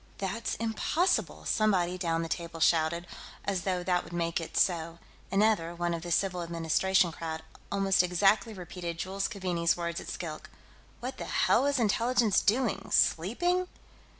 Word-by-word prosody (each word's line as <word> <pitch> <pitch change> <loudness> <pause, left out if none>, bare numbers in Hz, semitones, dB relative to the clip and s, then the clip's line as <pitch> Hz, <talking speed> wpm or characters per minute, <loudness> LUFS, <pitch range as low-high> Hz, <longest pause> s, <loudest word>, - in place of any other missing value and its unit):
"That's 195 +4 -3
impossible!" 230 - 0
somebody 185 -5 +2
down 165 -2 -1
the - - -3
table 165 0 -4
shouted, 165 +1 +2 0.4
as 190 -3 -1
though 180 -2 0
that 180 0 +1
would - - -12
make 170 0 -1
it 165 - -6
so. 170 -2 +1 0.3
Another 195 -5 +2
one 175 0 -1
of 165 - -3
the 175 - -6
civil 180 +1 +1
administration 170 +2 +1
crowd 160 0 -5 0.3
almost 195 -2 +3
exactly 195 +4 +2
repeated 175 -2 -6
Jules 195 +3 -2
Keaveney's 180 -5 0
words 170 -1 -3
at - - -11
Skilk: 160 -3 -6 0.5
"What 255 +2 -5
the - - -4
hell - - +3
was 285 +1 +1
Intelligence 230 -1 +2
doing, 235 +1 0
sleeping?" 350 - +2
180 Hz, 150 wpm, -29 LUFS, 170-205 Hz, 0.5 s, almost